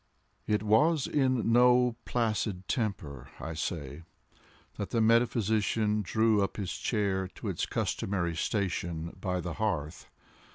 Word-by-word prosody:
It 105 0 +1
was 130 +8 +3
in 130 -5 +1
no 125 0 +5
placid 105 -5 -1
temper, 80 - -3
I 80 - -5
say, 75 -2 -4 0.8
that 100 - -4
the 115 - 0
metaphysician 110 -2 +2
drew 110 +2 +2
up 100 - -2
his 95 -4 -3
chair 100 -4 -1
to - - -5
its - - -2
customary 85 -4 -1
station 85 -4 -2
by 90 -1 -1
the 85 -2 -4
hearth. 80 -7 -2
105 Hz, 125 wpm, -30 LUFS, 85-115 Hz, 0.8 s, no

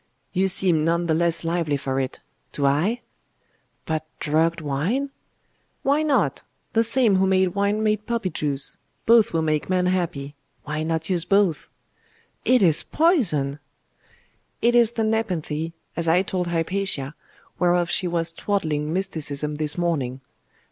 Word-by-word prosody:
You 190 +1 +2
seem 180 -4 +3
none 170 +2 +1
the 165 - +1
less 170 +1 +1
lively 165 -3 0
for 135 0 -2
it! 130 -1 -4 0.3
Do 140 - -1
I?' 175 - +1 0.8
'But 155 -1 -2 0.2
drugged 160 +3 +1
wine?' 165 - -1 0.7
'Why 285 +3 +2
not? 300 -3 +1 0.3
The 225 - +4
same 230 -3 +4
who 190 0 +2
made 190 -1 +3
wine 200 +3 0
made 215 -1 0
poppy 230 -6 -1
juice. 140 -2 -2 0.3
Both 230 -2 +5
will 165 -1 0
make 155 0 -1
man 185 -1 +1
happy. 170 -6 -1 0.3
Why 150 +1 -3
not 160 +2 -2
use 175 -3 +1
both?' 195 -4 +1 0.8
'It 255 -4 +4
is 160 -4 +5
poison!' 175 - +1 1.0
'It 240 +1 +3
is 235 -1 +4
the 225 - -1
nepenthe, 175 -8 -1 0.2
as 170 -1 -2
I 175 +3 +4
told 180 -2 -2
Hypatia, 170 -4 -1 0.5
whereof 175 -1 +2
she 185 - 0
was 170 -1 -1
twaddling 155 -6 -1
mysticism 150 -5 -3
this 150 +1 +1
morning. 140 -7 -1
170 Hz, 145 wpm, -23 LUFS, 155-200 Hz, 1.0 s, Both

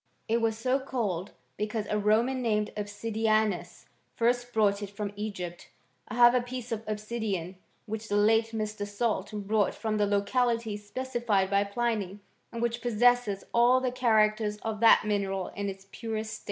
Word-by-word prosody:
It 230 +1 +1
was 225 -1 +1
so 255 +4 +1
called 210 -9 -2 0.3
because 215 0 -2
a 210 - 0
Roman 230 +5 +2
named 210 -3 0
Obsidianus 210 -3 -1 0.3
first 245 +1 +1
brought 210 -3 +2
it 205 - -5
from 205 0 -5
Egypt. 190 -5 -6 0.4
I - - -6
have 240 0 +7
a 250 - +3
piece 245 0 -7
of 225 -1 -2
obsidian, 210 -4 -3 0.3
which 220 0 -5
the 205 - 0
late 220 +2 +4
Mr. 215 -2 -4
Salt 215 +3 -1
brought 210 0 0
from 220 -2 -2
the 205 -1 +2
locality 230 +2 +1
specified 210 -2 -1
by 200 0 +3
Pliny, 205 -3 -2 0.3
and 235 0 -4
which 235 0 -1
possesses 240 -3 +2
all 240 +2 +5
the 255 -1 -1
characters 215 -3 +2
of 220 -2 -3
that 230 0 +6
mineral 195 -3 -1
in 200 0 -4
its 195 0 -9
purest 220 -1 -4
state. - - -7
215 Hz, 165 wpm, -29 LUFS, 205-235 Hz, 0.4 s, have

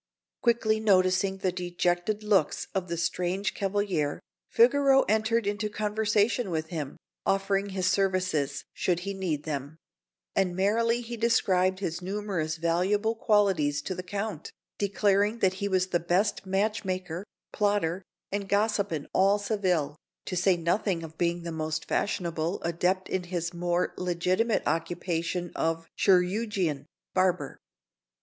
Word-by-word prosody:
Quickly 225 -2 +2
noticing 190 -2 +3
the 190 -1 0
dejected 175 +3 -1
looks 200 -8 +2
of 190 -2 -1
the 170 0 -3
strange 180 +3 -1
cavalier, 195 -7 -1 0.3
Figaro 270 +3 +5
entered 220 +1 +1
into 205 +1 -1
conversation 210 +1 +1
with 160 -2 -2
him, 155 -6 -5 0.3
offering 195 +1 +1
his 190 -1 -2
services, 185 -7 +1
should 175 -1 0
he 200 +2 -3
need 175 -7 -2
them; 145 0 -4 0.6
and 185 -2 +1
merrily 230 +5 +2
he 240 0 -6
described 190 -5 +2
his 170 -2 -3
numerous 185 -5 -2
valuable 185 +7 +1
qualities 195 -10 +2
to 185 - -3
the 180 - -5
Count, 200 -1 -5 0.3
declaring 205 +2 +2
that 190 -4 +2
he 200 - +1
was 185 -1 +1
the 175 - +1
best 190 +4 0
match 205 +3 0
maker, 185 -2 -3 0.3
plotter, 200 -4 +1 0.3
and 200 -1 -3
gossip 205 0 +1
in 150 -3 -3
all 195 +2 +4
Seville, 185 -8 0 0.3
to 185 - -4
say 180 0 +3
nothing 170 +1 0
of 160 0 -9
being 175 0 0
the 170 - -4
most 155 0 -3
fashionable 170 -4 -1
adept 180 +3 0
in 185 -1 -2
his 175 -1 -3
more 175 +1 0
legitimate 180 +5 +1
occupation 170 +1 -2
of 165 0 -1
chirurgeon 185 -5 +1 0.3
barber. 185 -1 +1
185 Hz, 135 wpm, -28 LUFS, 170-205 Hz, 0.6 s, Figaro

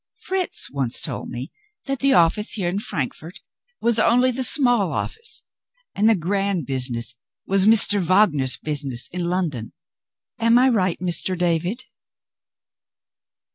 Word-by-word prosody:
Fritz 380 -4 -3
once 135 -4 -2
told - - -5
me 125 +3 -7 0.3
that 275 -2 -3
the 275 0 +2
office 210 -1 +2
here 190 -5 -2
in 185 +3 -2
Frankfort 165 - -5 0.4
was 235 -1 +2
only 250 +4 +3
the 260 +2 -3
small 245 - +2
office 460 +1 -5 0.5
and 215 +3 +2
the 225 - +4
grand 195 -1 -2
business 125 -3 -1 0.3
was 195 +1 +2
Mr. 210 -2 +6
Wagner's 165 -8 +2
business 140 -5 -3
in 175 0 -4
London. 170 -10 -3 0.7
Am 230 +1 +4
I 255 +2 +4
right, 185 -7 0
Mr. 180 +1 0
David?" 175 +7 -1
185 Hz, 135 wpm, -21 LUFS, 155-230 Hz, 0.7 s, Mr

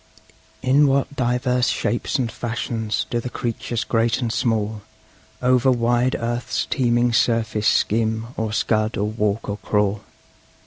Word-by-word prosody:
In 140 +3 +4
what 140 +1 +1
divers 125 -1 +1
shapes 115 +3 -1
and 120 -4 -1
fashions 115 -2 -3
do 120 - +1
the 125 - -5
creatures 120 -1 -3
great 115 0 +1
and 120 -3 -2
small 110 -3 -1 0.6
Over 125 +1 +4
wide 120 +1 +2
earth's 120 +1 -2
teeming 120 -2 +1
surface 115 -2 +1
skim, 110 +1 +1
or 110 -1 -2
scud, 110 0 0
or 100 - 0
walk, 105 0 -1
or 100 - -3
crawl! 105 -1 0
115 Hz, 135 wpm, -22 LUFS, 110-125 Hz, 0.6 s, In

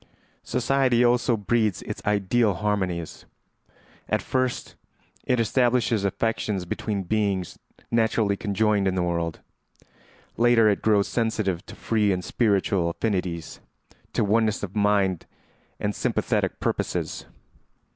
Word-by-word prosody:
] - - -37
Society 125 -1 +2
also 120 -1 +2
breeds 110 -2 0
its - - -6
ideal 105 +1 +2
harmonies. 90 -4 -2 0.8
At - - 0
first 130 -1 -1 0.5
it 125 -1 +1
establishes 120 -2 +2
affections 100 -1 -1
between 100 +3 -3
beings 100 -2 -1 0.3
naturally 110 -3 +2
conjoined 105 0 +1
in 95 - 0
the 90 - +1
world; 85 -2 -2 1.0
later 115 -1 +5
it 100 -2 +2
grows 105 -2 +3
sensitive 110 -6 -1
to - - -10
free 105 -3 +1
and 90 -1 -2
spiritual 100 -5 +1
affinities, 90 -4 -3 0.5
to - - +1
oneness 110 +1 +1
of 95 0 -5
mind 100 -4 +1 0.5
and 105 0 -1
sympathetic - - -1
purposes. - - -2
105 Hz, 115 wpm, -25 LUFS, 95-115 Hz, 1.0 s, later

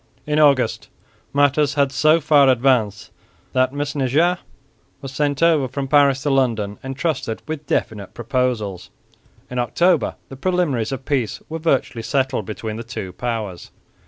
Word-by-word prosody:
In 150 0 0
August 140 -6 +3 0.4
matters 145 0 +2
had 140 -2 +2
so 155 +4 +4
far 145 -3 +5
advanced 120 -5 +1 0.4
that 130 0 +2
Mesnager 145 +4 0 0.6
was 135 -1 -8
sent 145 +2 -1
over 160 -5 +4
from 135 +2 -4
Paris 140 -1 +4
to 145 - +1
London 115 -7 0
entrusted 135 -3 -3
with 155 -2 -5
definite 105 -7 -2
proposals. 120 -6 -2 0.6
In 125 - -4
October 170 +7 +2
the 135 - -9
preliminaries 150 -9 0
of 135 -1 -5
peace 130 -6 -1
were 160 +1 -4
virtually 135 -6 0
settled 130 +2 -1
between 110 0 -5
the 115 - -5
two 105 -6 -6
powers. 110 -6 -4
135 Hz, 140 wpm, -21 LUFS, 120-145 Hz, 0.6 s, far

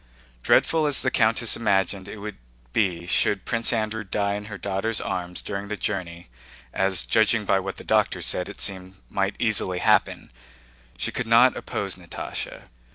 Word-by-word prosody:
Dreadful 160 - +3
as 145 - +3
the 130 - +1
countess 115 0 +3
imagined 95 -3 0
it 110 - -8
would 105 0 -7 0.4
be 90 -4 0
should 95 +2 +1
Prince 115 0 +1
Andrew 110 -1 -1
die 100 +1 -1
in 105 0 -5
her 105 -2 -7
daughter's 100 +3 -2
arms 90 -1 -3
during 100 0 -5
the 105 +1 -4
journey—as, 85 0 -2
judging 110 0 +2
by 95 - +3
what 95 0 -5
the - - -10
doctor - - +1
said, 90 - 0
it 100 - -9
seemed 95 -1 -1 0.2
might 100 0 0
easily 105 -5 +1
happen—she - - -2
could 125 - -3
not 120 +3 +6
oppose 100 -2 -4
Natásha. 90 -2 -7
100 Hz, 160 wpm, -24 LUFS, 90-110 Hz, 0.4 s, not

